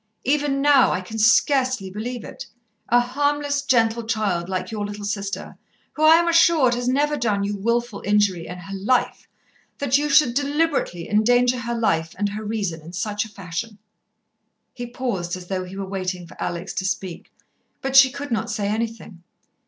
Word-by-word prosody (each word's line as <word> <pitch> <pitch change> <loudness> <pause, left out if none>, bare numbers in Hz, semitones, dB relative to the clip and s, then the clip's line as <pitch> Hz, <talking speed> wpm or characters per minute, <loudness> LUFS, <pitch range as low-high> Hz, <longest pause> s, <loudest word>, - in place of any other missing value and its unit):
Even 280 0 +1
now, 285 -2 +5
I - - 0
can 205 +4 -7
scarcely 255 -2 +3
believe 230 +4 -5
it - - -9 0.4
a 240 - +5
harmless, 285 +3 0
gentle 235 -4 +2
child 205 -6 -1
like 185 +1 -3
your 215 -2 -3
little 205 0 -6
sister, 200 -1 -4 0.3
who, 305 - -7
I 315 +1 +8
am 340 +1 +3
assured, 330 -6 +4
has 245 0 -2
never 290 +3 +1
done 215 -7 0
you 205 +1 -2
wilful 235 +1 -1
injury 205 -4 +1
in 180 - -7
her 195 +2 -8
life 225 +6 0 0.5
that 280 0 +2
you 295 0 -1
should 275 -4 +5
deliberately 285 - -1
endanger 245 +4 +3
her 235 0 -3
life 165 -8 0
and 205 +1 0
her 210 +2 -6
reason 205 -7 -3
in 165 +3 -12
such 205 +3 -2
a - - -12
fashion." 200 +2 -6 1.0
He 245 -1 -6
paused, 200 -9 -3
as 180 - -10
though 185 -1 -2
he 185 +2 -9
were 195 - -3
waiting 185 -2 -4
for 165 - -14
Alex 175 +2 -4
to 190 - -4
speak, 185 -2 -4 0.5
but 270 0 -3
she 265 0 +9
could 280 +1 -7
not 225 0 -1
say 205 -2 -2
anything. 220 -4 -4
220 Hz, 180 wpm, -22 LUFS, 195-260 Hz, 1.0 s, she